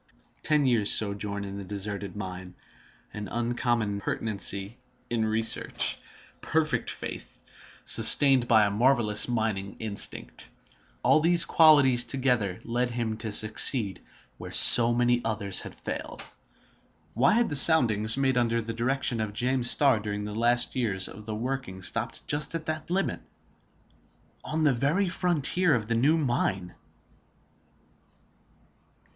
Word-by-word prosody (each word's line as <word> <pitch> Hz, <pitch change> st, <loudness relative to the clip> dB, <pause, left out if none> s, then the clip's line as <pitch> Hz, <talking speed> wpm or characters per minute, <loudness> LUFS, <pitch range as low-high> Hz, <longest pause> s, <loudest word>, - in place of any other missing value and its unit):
Ten 150 Hz, -2 st, 0 dB
years' 115 Hz, -5 st, +1 dB
sojourn 100 Hz, -1 st, -3 dB
in 100 Hz, 0 st, -8 dB
the -, -, -8 dB
deserted 100 Hz, +1 st, -7 dB
mine, 90 Hz, -2 st, -9 dB, 0.6 s
an 105 Hz, -1 st, -8 dB
uncommon 120 Hz, -2 st, -3 dB
pertinacity 100 Hz, +1 st, -4 dB, 0.3 s
in 115 Hz, -2 st, -1 dB
research, 110 Hz, +1 st, -1 dB, 0.5 s
perfect 155 Hz, -1 st, -2 dB
faith, -, -, -9 dB, 0.4 s
sustained 135 Hz, -4 st, +4 dB
by 110 Hz, -3 st, +3 dB
a 100 Hz, -, -2 dB
marvelous 115 Hz, -1 st, +1 dB
mining 110 Hz, -5 st, -4 dB
instinct—all -, -, -3 dB
these 170 Hz, +1 st, +4 dB
qualities 145 Hz, -8 st, +3 dB
together 125 Hz, -9 st, -2 dB
led 120 Hz, +2 st, -3 dB
him 115 Hz, -2 st, -4 dB
to 110 Hz, -1 st, -6 dB
succeed 110 Hz, -1 st, 0 dB, 0.4 s
where -, -, -10 dB
so 120 Hz, -1 st, +10 dB
many 120 Hz, 0 st, 0 dB
others 100 Hz, -4 st, -2 dB
had -, -, -11 dB
failed. -, -, -8 dB, 0.9 s
Why 125 Hz, +5 st, +1 dB
had 235 Hz, +1 st, 0 dB
the -, -, -2 dB
soundings 115 Hz, -7 st, +4 dB
made 130 Hz, -2 st, 0 dB
under 115 Hz, -1 st, -1 dB
the 115 Hz, 0 st, -6 dB
direction 120 Hz, 0 st, -3 dB
of 105 Hz, -1 st, -5 dB
James 125 Hz, +2 st, -1 dB
Starr 135 Hz, -6 st, +3 dB
during 105 Hz, -1 st, -6 dB
the 105 Hz, -, -7 dB
last 120 Hz, +2 st, 0 dB
years 105 Hz, -7 st, +1 dB
of 105 Hz, +1 st, -13 dB
the 110 Hz, -, -5 dB
working 115 Hz, -5 st, -6 dB
stopped -, -, -4 dB
just 150 Hz, +2 st, -3 dB
at 165 Hz, -1 st, -6 dB
that 155 Hz, 0 st, -6 dB
limit, 190 Hz, +2 st, -3 dB, 1.2 s
on 155 Hz, +1 st, -4 dB
the 145 Hz, -3 st, +2 dB
very 150 Hz, +10 st, -1 dB
frontier 175 Hz, -2 st, 0 dB
of 110 Hz, -3 st, -4 dB
the 115 Hz, -, -2 dB
new 140 Hz, +8 st, +1 dB
mine? 100 Hz, -, -3 dB
115 Hz, 130 wpm, -25 LUFS, 105-135 Hz, 1.2 s, so